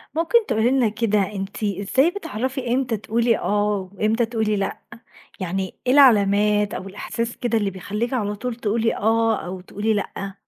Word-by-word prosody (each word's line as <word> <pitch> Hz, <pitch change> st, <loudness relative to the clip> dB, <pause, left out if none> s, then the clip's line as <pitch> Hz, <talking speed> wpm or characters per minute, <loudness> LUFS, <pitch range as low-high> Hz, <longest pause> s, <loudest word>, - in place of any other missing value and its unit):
ممكن 415 Hz, +8 st, +3 dB
تقولي 220 Hz, +2 st, +1 dB
لنا 255 Hz, -4 st, +3 dB
كده 210 Hz, -1 st, +1 dB
أنتِ 195 Hz, +2 st, -5 dB
إزاي 205 Hz, -, +2 dB
بتعرفي 260 Hz, -, -3 dB
امتى 250 Hz, -3 st, 0 dB
تقولي 230 Hz, +2 st, +1 dB
آه 205 Hz, -2 st, 0 dB
وامتى 215 Hz, +4 st, +1 dB
تقولي 220 Hz, -2 st, -1 dB
لأ؟ 195 Hz, -1 st, -2 dB, 0.6 s
يعني 190 Hz, 0 st, -3 dB
إيه 250 Hz, -, +4 dB
العلامات 210 Hz, -5 st, +4 dB
أو 190 Hz, -, -5 dB
الإحساس 230 Hz, +4 st, -4 dB
كده 235 Hz, -2 st, 0 dB
اللي 205 Hz, -2 st, 0 dB
بيخليكِ 210 Hz, +6 st, -3 dB
على 210 Hz, -4 st, -1 dB
طول 245 Hz, +3 st, -4 dB
تقولي 230 Hz, 0 st, 0 dB
آه 225 Hz, +1 st, +2 dB
أو 185 Hz, +1 st, -6 dB
تقولي 205 Hz, +4 st, -2 dB
لأ؟ 195 Hz, -1 st, -4 dB
215 Hz, 160 wpm, -22 LUFS, 200-235 Hz, 0.6 s, إيه